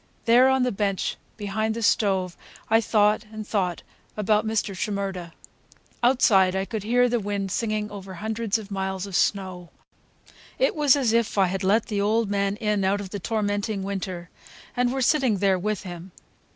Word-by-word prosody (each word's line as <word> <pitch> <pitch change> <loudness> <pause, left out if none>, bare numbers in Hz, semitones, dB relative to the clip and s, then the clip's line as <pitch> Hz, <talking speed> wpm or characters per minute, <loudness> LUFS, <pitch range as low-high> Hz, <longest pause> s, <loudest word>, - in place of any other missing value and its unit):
There, 245 +3 +6
on 265 -1 +3
the 250 - +1
bench 200 -1 -1 0.2
behind 215 +1 -2
the 230 - -4
stove, 190 -4 +1 0.4
I 225 +1 +5
thought 210 0 +2
and 215 -1 -7
thought 180 -5 -1 0.3
about 210 +1 +1
Mr. 215 -3 -1
Shimerda. 195 -3 -3 0.7
Outside 210 -7 +4
I 190 0 0
could 220 +1 -4
hear 245 +4 +3
the 240 0 0
wind 200 -2 -3
singing 215 0 -2
over 195 -2 -8
hundreds 220 +2 -1
of 210 -2 -10
miles 190 -1 -3
of 195 -3 -6
snow. 185 -4 0 0.9
It - - +2
was 295 -3 +4
as 255 -6 +1
if 230 -2 +1
I 195 - +5
had 190 +2 -3
let 210 +4 +3
the 205 -2 -2
old 215 +1 +1
man 200 0 0
in 210 -2 0
out 195 +2 +1
of 195 -2 -7
the 205 - -4
tormenting 205 0 -2
winter, 185 -3 -5 0.4
and 245 0 +1
were 265 0 -1
sitting 260 -6 +2
there 190 -1 +2
with 210 +2 -2
him. 175 0 -8
205 Hz, 180 wpm, -25 LUFS, 195-225 Hz, 0.9 s, There